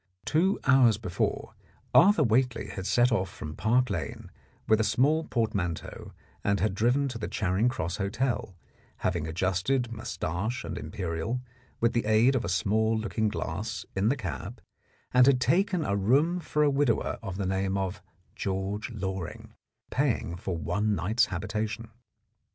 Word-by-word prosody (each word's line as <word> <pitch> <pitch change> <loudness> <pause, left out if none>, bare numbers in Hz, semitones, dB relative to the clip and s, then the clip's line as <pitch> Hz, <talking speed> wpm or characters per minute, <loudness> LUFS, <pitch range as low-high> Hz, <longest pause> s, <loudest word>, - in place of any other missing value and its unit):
Two 180 +7 +2
hours 130 -5 +5
before, 90 -5 -2 0.4
Arthur 195 -3 +6
Whately 125 0 +1
had 95 0 -5
set 120 +1 +3
off 95 -5 +1
from 75 -3 -7
Park 125 +3 +2
Lane - - -5 0.4
with 110 0 +4
a - - +3
small 150 +8 +2
portmanteau 100 -8 -2 0.3
and 100 -1 +1
had 105 -1 +1
driven 125 +8 +2
to 120 -3 -6
the 105 - -3
Charing 95 +5 +1
Cross 90 -10 -3
Hotel, 105 0 -2 0.5
having 85 -4 0
adjusted 95 +9 0
moustache 110 +1 -3
and 85 +1 -5
imperial 85 - -3 0.4
with 115 0 +2
the 120 - 0
aid 110 +5 +4
of 130 - 0
a 85 - -3
small 110 +5 +1
looking 110 0 -1
glass 105 +3 -4
in 100 +3 +2
the 140 - +1
cab, 95 - -5 0.5
and 125 0 +6
had 135 -2 +5
taken 180 +5 +2
a 100 - 0
room 140 - +2
for 150 -2 0
a 145 - +4
widower 135 -5 +1
of 95 -4 -5
the 100 - -2
name 95 +1 0
of 95 0 -3 0.3
George 100 +3 -3
Loring, 95 -6 -5 0.4
paying 130 -10 0
for 90 0 -4
one 105 +6 0
night's 110 +6 +2
habitation. 110 +3 -3
110 Hz, 155 wpm, -28 LUFS, 95-125 Hz, 0.5 s, Arthur